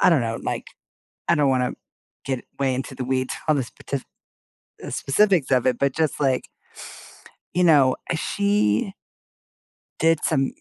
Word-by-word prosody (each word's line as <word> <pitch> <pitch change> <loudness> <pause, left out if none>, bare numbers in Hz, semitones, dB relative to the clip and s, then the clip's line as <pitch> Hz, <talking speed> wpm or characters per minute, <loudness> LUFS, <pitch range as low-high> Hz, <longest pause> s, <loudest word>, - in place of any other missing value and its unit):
I - - +6
don't 160 -8 +4
know, 115 0 -2
like, - - -3 0.6
I 170 - +4
don't 145 -3 +3
wanna 125 -1 +1 0.5
get 130 -2 -3
way 135 -2 +1
into 130 +1 -4
the 130 - -5
weeds 130 0 -1
on 155 - +4
the 135 - 0
spetif 135 +2 -6 0.8
uh, - - -6
specifics 175 -1 +2
of 130 -2 +3
it, 125 -2 +2
but 140 -1 +1
just 160 -2 0
like 135 -3 +1 1.1
you 180 - +3
know, 145 -6 +5 0.2
uh, - - +1
she 200 - +1 1.1
did 165 -1 +3
some 135 -4 +1
135 Hz, 160 wpm, -23 LUFS, 130-160 Hz, 1.1 s, I